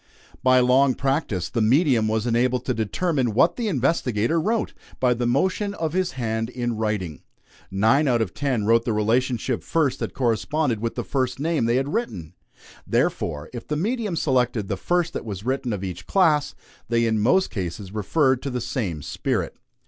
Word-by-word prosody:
By 130 0 +5
long 130 +1 +4
practice, 135 - -1
the 115 - -2
medium 125 -1 +3
was 110 +1 0
enabled 120 +1 +1
to 125 - 0
determine 125 - -1
what 170 +8 +4
the 235 -2 -2
investigator 135 - +1
wrote, 220 +5 -1 0.3
by 125 -1 +3
the 120 0 -1
motion 190 - 0
of 160 -4 -2
his 185 -5 0
hand 115 -2 -2
in 120 -2 -3
writing. 105 -7 -2 0.5
Nine 115 +10 +3
out 120 -3 +3
of 110 -6 -1
ten 130 -7 -1
wrote 115 +1 +4
the 115 - -1
relationship 115 +1 0
first 150 - 0
that - - -4
corresponded 120 +2 0
with 115 +1 -3
the 120 - -2
first 130 -1 -1
name 155 -4 0
they 115 +1 +2
had 135 +3 -1
written. 95 - -3 0.5
Therefore, 75 0 -1
if 120 - -7
the 150 - -1
medium 215 +1 -1
selected 125 -9 0
the - - 0
first 175 -2 0
that - - -4
was 100 -2 -6
written 130 -1 -1
of 100 -2 -3
each 90 -2 -6
class, 150 -6 +2 0.3
they 115 0 +2
in 110 -1 +1
most 160 - +3
cases 95 +1 -5
referred 130 +5 +1
to 140 - -3
the 125 -1 -2
same 105 - -3
spirit. - - -2
125 Hz, 180 wpm, -23 LUFS, 110-145 Hz, 0.5 s, By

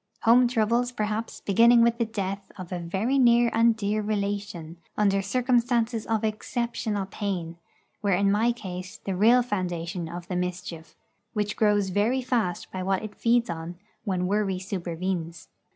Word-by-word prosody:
Home 240 +2 +6
troubles, 235 +1 +1
perhaps, 215 0 -3
beginning 230 +4 +5
with 235 0 +2
the 230 - +2
death 200 -2 -4
of 185 -1 -8
a 180 - -2
very 195 +11 0
near 240 -1 +5
and 230 0 +4
dear 210 0 -1
relation 200 -5 -3 0.2
under 195 -2 +3
circumstances 240 +1 +1
of 225 -1 0
exceptional 220 -1 -2
pain, 185 -4 -4 0.4
were 205 - 0
in 195 +2 +3
my 225 +4 +3
case 185 -5 -7
the 195 - -4
real 235 +6 +5
foundation 175 -5 -3
of 175 0 -7
the 180 - -3
mischief, 175 -3 -5 0.4
which 210 -1 -1
grows 205 -2 +2
very 225 +7 +1
fast 230 -8 -1
by 185 - -4
what 190 +2 0
it 215 -1 -6
feeds 235 +1 +2
on 170 +1 -6 0.3
when 185 -4 -1
worry 195 -1 0
supervenes. 175 -3 -4
205 Hz, 155 wpm, -26 LUFS, 185-230 Hz, 0.4 s, Home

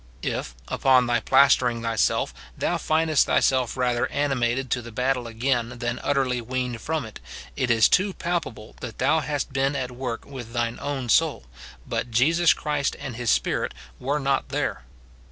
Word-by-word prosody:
If, - - -3
upon 130 -2 +3
thy 120 0 +2
plastering 125 -2 +4
thyself, 115 -2 +1 0.2
thou - - 0
findest 155 -2 +2
thyself 130 -2 +2
rather 125 0 +1
animated 130 -3 0
to 120 - +1
the 120 0 -10
battle 125 +1 0
again 120 +1 -1
than 120 0 -3
utterly 130 -3 0
weaned 125 0 -3
from 160 -4 -2
it, 110 - -10 0.4
it 130 - -1
is 115 -2 +5
too 195 +2 +3
palpable 170 -11 -4
that 115 -2 -7
thou 145 +5 +3
hast 145 -2 -3
been 135 +1 +1
at 130 -2 -3
work 125 -2 -5
with 120 -5 -9
thine 120 -1 -1
own 140 -3 -3
soul, 65 - +2 0.4
but 120 - -3
Jesus 160 +9 +4
Christ 150 -2 -1
and 125 - -6
his 120 -1 -2
Spi - - +2
rit - - -2 0.3
were 140 +4 -1
not 135 -1 0
there. - - -2
125 Hz, 170 wpm, -25 LUFS, 120-140 Hz, 0.4 s, is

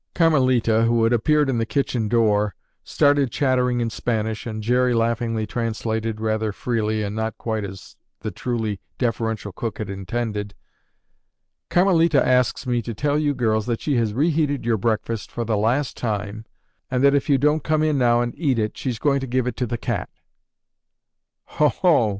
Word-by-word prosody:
Carmelita, 130 -9 +3
who 115 0 +2
had 115 +2 +3
appeared 150 +5 +3
in 130 -3 0
the - - +1
kitchen 125 -4 -1
door, 105 -3 +2 0.3
started 145 -2 +2
chattering 125 -3 +1
in 115 -1 -1
Spanish 110 -1 -2
and 110 -1 -5
Jerry 125 +2 +2
laughingly 115 -1 0
translated, 110 -1 -3
rather 110 -1 -1
freely, 110 0 -1
and 100 0 -4
not 110 0 -3
quite 110 -2 -3
as 95 -1 -9 0.2
the 110 - -4
truly 110 -1 -3 0.2
deferential 110 -4 -2
cook 110 +2 -5
had 105 -2 -4
intended. 105 +1 -4 1.1
"Carmelita 170 -5 +3
asks 125 +1 +2
me 120 -1 0
to 115 0 -6
tell 145 +6 0
you 145 -2 0
girls 110 -3 0
that 115 -2 -1
she 145 - -1
has 110 -3 0
reheated 145 -2 +1
your 115 -2 +2
breakfast 110 0 -2
for 120 - -3
the 110 -1 0
last 120 +7 0
time 105 -1 -3 0.4
and 125 0 0
that 140 0 +6
if 140 +1 0
you 140 - +5
don't 150 +2 +2
come 155 -1 +1
in 155 -3 +1
now 120 -1 +3
and 120 0 -2
eat 140 -6 0
it, 110 -1 -1
she's 125 -4 -3
going 140 +1 +1
to 135 - -5
give 130 0 0
it 125 - -2
to 125 - -1
the 120 +1 -3
cat." - - -3 1.5
"Oho!" 150 - +3
120 Hz, 175 wpm, -22 LUFS, 110-135 Hz, 1.5 s, that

